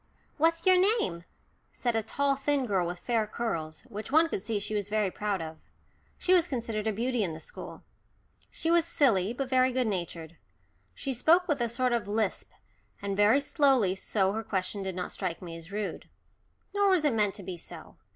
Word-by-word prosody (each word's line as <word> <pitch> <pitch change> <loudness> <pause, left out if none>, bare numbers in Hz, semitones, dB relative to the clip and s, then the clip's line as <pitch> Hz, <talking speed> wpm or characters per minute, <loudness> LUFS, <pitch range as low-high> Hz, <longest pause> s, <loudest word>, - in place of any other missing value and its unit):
"What's 330 +2 +2
your 370 -1 +6 0.2
name?" 170 - -2 0.5
said 240 -2 -1
a 225 - +2
tall 275 +5 +1
thin 275 0 0
girl 190 -6 +1
with 175 +1 -4
fair 225 +1 0
curls, 165 -9 -3
which 220 -2 -8
one 320 +2 +5
could 195 - -3
see 220 +1 -2
she 205 +1 -4
was 205 -1 -2
very 210 -2 +1
proud 200 -4 -2
of. 160 0 -8 0.6
She 370 - +3
was 350 -2 +5
considered 225 -4 -3
a - - +2
beauty 235 +2 0
in 170 -4 -2
the - - -8
school. - - -9 0.7
She 325 - -1
was 340 -1 +5
silly, 230 - +2
but 265 +2 -3
very 255 0 +3
good 255 0 +1
natured. 170 -5 -4 0.6
She 270 - -3
spoke 335 +9 +4
with 295 -6 0
a 235 - +1
sort 250 +1 0
of 230 -4 -1
lisp, 210 -1 -1 0.5
and 200 0 -3
very 205 +7 +5
slowly, 270 - +3
so 195 0 0
her 220 - -2
question 195 0 -2
did 190 -2 -4
not 180 -1 -4
strike 180 -4 -3
me 170 -2 -8
as 165 +2 -11
rude. 205 0 -4 0.6
Nor 405 0 +3
was 365 -5 +3
it 290 - +3
meant 210 -3 +1
to 205 - -8
be 185 0 -5
so. 170 -1 -9
220 Hz, 200 wpm, -29 LUFS, 190-270 Hz, 0.7 s, your